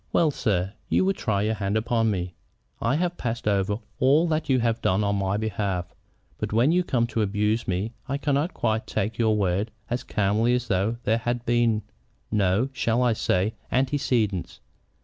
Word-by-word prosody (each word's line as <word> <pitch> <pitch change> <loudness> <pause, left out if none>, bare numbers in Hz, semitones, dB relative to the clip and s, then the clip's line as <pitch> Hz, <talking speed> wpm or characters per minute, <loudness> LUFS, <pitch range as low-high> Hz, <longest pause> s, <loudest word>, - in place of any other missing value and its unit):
"Well, 160 -3 +3
sir, 100 -7 -1 0.2
you - - +3
would 195 0 +1
try 100 -4 0
your 110 +1 +1
hand 100 0 -1
upon 115 0 +1
me. 90 -3 -2 0.5
I 115 +4 +2
have 175 +2 -1
passed 115 -2 -3
over 100 0 +1 0.2
all 145 +6 +4
that 155 -1 -1
you 130 -1 +4
have 115 -1 0
done 95 +3 +2
on 100 0 +1
my 100 +1 0
behalf. 100 -5 -2 0.5
But - - -3
when 120 +7 +3
you 180 +1 +3
come 120 -8 +1
to 115 -1 -2
abuse 105 +2 0
me 95 +5 -1 0.2
I 140 - 0
cannot 145 +3 0
quite 110 0 0
take 110 +2 -2
your 110 -2 +3
words 100 +2 0 0.2
as 120 0 0
calmly 110 +1 +1
as 125 -1 -3
though 100 +4 +1
there 110 +2 +2
had 120 +1 -2
been 115 -2 +2 0.5
no, 105 +4 +2
shall 120 -1 +1
I 120 -2 +3
say, 100 0 0 0.2
antecedents? 125 - 0
110 Hz, 185 wpm, -25 LUFS, 100-125 Hz, 0.5 s, all